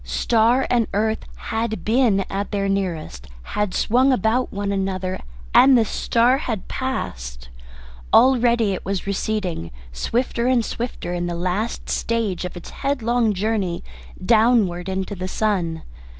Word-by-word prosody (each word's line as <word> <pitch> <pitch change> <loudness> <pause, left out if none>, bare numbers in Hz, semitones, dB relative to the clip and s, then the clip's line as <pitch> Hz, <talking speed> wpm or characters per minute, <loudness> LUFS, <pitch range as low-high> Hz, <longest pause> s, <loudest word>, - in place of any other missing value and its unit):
Star 230 - +2
and 235 -3 +2
earth 220 +1 0
had 220 0 -3
been 225 -3 +3
at 195 +1 -3
their 200 -1 -1
nearest, 175 - -3 0.3
had 210 -2 0
swung 255 +4 +3
about 245 +2 +1
one 200 0 -2
another, 190 -1 -2 0.3
and 265 -1 +7
the 225 - +3
star 240 +5 +2
had 225 -9 -4
passed. - - -4 0.6
Already 240 -5 +4
it 185 - -5
was 195 0 -3
receding, 195 - -2 0.2
swifter 235 - -1
and 250 -3 +3
swifter, 230 -7 -4
in 175 0 -2
the 175 - -3
last 185 +6 -2
stage 220 -6 -1
of 180 - -6
its 175 - -10
headlong 245 -4 0
journey 195 -3 -1 0.4
downward 215 -5 +3
into 190 +1 -3
the 185 -1 -4
sun. 185 -6 -1
210 Hz, 135 wpm, -22 LUFS, 185-235 Hz, 0.6 s, and